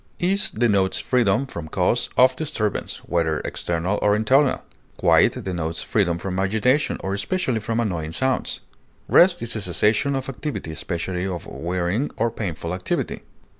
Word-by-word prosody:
Ease 195 Hz, +3 st, +2 dB
denotes 100 Hz, -4 st, +1 dB
freedom 125 Hz, 0 st, +2 dB
from 85 Hz, -, -7 dB
cause -, -, 0 dB
of 130 Hz, +1 st, +6 dB
disturbance, 115 Hz, -8 st, -3 dB
whether 80 Hz, -3 st, 0 dB
external 85 Hz, +4 st, -2 dB
or 105 Hz, 0 st, +3 dB
internal. 130 Hz, +6 st, +3 dB, 0.3 s
Quiet -, -, +3 dB
denotes 85 Hz, -3 st, -3 dB
freedom 90 Hz, -6 st, +1 dB
from 95 Hz, +1 st, -3 dB
agitation, 110 Hz, +9 st, +1 dB
or 95 Hz, -, -2 dB
especially 125 Hz, -, -1 dB
from 115 Hz, +1 st, -2 dB
annoying 90 Hz, -9 st, -2 dB
sounds. 130 Hz, +6 st, -1 dB, 0.5 s
Rest 175 Hz, -4 st, +5 dB
is 115 Hz, 0 st, 0 dB
a 110 Hz, -, -2 dB
cessation 105 Hz, -, +1 dB
of 135 Hz, -1 st, -3 dB
activity 135 Hz, -, -5 dB
especially 90 Hz, +3 st, -3 dB
of 90 Hz, -3 st, -5 dB
wearying 90 Hz, -, -2 dB
or 115 Hz, +1 st, +1 dB
painful 85 Hz, -5 st, -4 dB
activity. 90 Hz, 0 st, -2 dB
105 Hz, 145 wpm, -23 LUFS, 90-130 Hz, 0.5 s, of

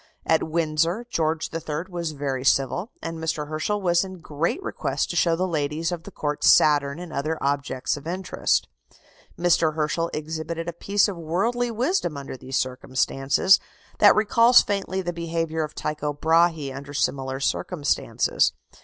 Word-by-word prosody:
At 160 Hz, -, +3 dB
Windsor, 165 Hz, +6 st, 0 dB
George 160 Hz, -3 st, -1 dB
III. 160 Hz, -1 st, -3 dB
was 170 Hz, -4 st, -4 dB
very 135 Hz, -3 st, -3 dB
civil, 135 Hz, -, +1 dB
and 165 Hz, 0 st, -5 dB
Mr. 155 Hz, -2 st, -2 dB
Herschel 160 Hz, +7 st, -1 dB
was 175 Hz, -1 st, +3 dB
in 190 Hz, -1 st, -8 dB
great 165 Hz, -, -2 dB
request -, -, -2 dB
to -, -, -5 dB
show 170 Hz, -1 st, +3 dB
the 185 Hz, +3 st, -1 dB
ladies 155 Hz, 0 st, -1 dB
of 170 Hz, -2 st, -5 dB
the -, -, -9 dB
Court 145 Hz, -1 st, -3 dB
Saturn 145 Hz, -1 st, +5 dB
and 175 Hz, -1 st, -8 dB
other 155 Hz, +3 st, -1 dB
objects 140 Hz, -2 st, -1 dB
of 145 Hz, +2 st, -10 dB
interest. 185 Hz, +1 st, 0 dB, 0.7 s
Mr. 165 Hz, -2 st, +2 dB
Herschel 160 Hz, +2 st, 0 dB
exhibited 160 Hz, +2 st, -4 dB
a 170 Hz, -, -3 dB
piece 200 Hz, +5 st, +2 dB
of 200 Hz, -4 st, -5 dB
worldly 200 Hz, +10 st, 0 dB
wisdom 235 Hz, -, -1 dB
under 140 Hz, -1 st, -7 dB
these 130 Hz, +1 st, -4 dB
circumstances, 135 Hz, +6 st, +2 dB, 0.4 s
that 205 Hz, -, +7 dB
recalls 230 Hz, +3 st, +6 dB
faintly 190 Hz, -1 st, -2 dB
the 175 Hz, 0 st, -3 dB
behaviour 165 Hz, -1 st, -2 dB
of 150 Hz, -, -6 dB
Tycho 150 Hz, -1 st, -3 dB
Brahé 160 Hz, -3 st, +2 dB
under 140 Hz, +1 st, -8 dB
similar 135 Hz, -1 st, -1 dB
circumstances. 145 Hz, +1 st, 0 dB
160 Hz, 155 wpm, -24 LUFS, 145-175 Hz, 0.7 s, that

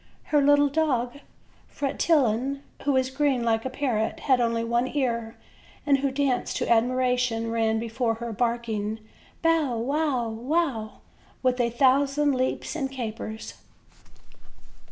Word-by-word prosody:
Her 295 Hz, -, +5 dB
little 290 Hz, +1 st, +5 dB
dog, 280 Hz, -4 st, 0 dB, 0.5 s
Fretillon, 275 Hz, -2 st, 0 dB, 0.2 s
who 285 Hz, -, +2 dB
was 260 Hz, 0 st, +1 dB
green 270 Hz, -3 st, +1 dB
like 225 Hz, 0 st, +1 dB
a -, -, -1 dB
parrot, 250 Hz, -5 st, -1 dB
had 260 Hz, -3 st, +3 dB
only 230 Hz, -1 st, 0 dB
one 235 Hz, +2 st, +1 dB
ear, 235 Hz, -5 st, -2 dB, 0.5 s
and 280 Hz, -2 st, +3 dB
who 275 Hz, 0 st, +1 dB
danced 265 Hz, -2 st, -1 dB
to -, -, -1 dB
admiration, 245 Hz, -1 st, +1 dB
ran 225 Hz, -1 st, +1 dB
before 230 Hz, +1 st, -1 dB
her 235 Hz, 0 st, -5 dB
barking 225 Hz, -2 st, -1 dB, 0.5 s
"bow, 320 Hz, -7 st, +2 dB
Wow, 270 Hz, 0 st, 0 dB
wow," 235 Hz, -1 st, -2 dB, 0.4 s
with 255 Hz, -1 st, +2 dB
a 235 Hz, -, +1 dB
thousand 275 Hz, +4 st, +3 dB
leaps 255 Hz, +4 st, -2 dB
and 270 Hz, -4 st, -2 dB
capers. 220 Hz, -3 st, -6 dB
250 Hz, 130 wpm, -26 LUFS, 230-280 Hz, 0.5 s, Her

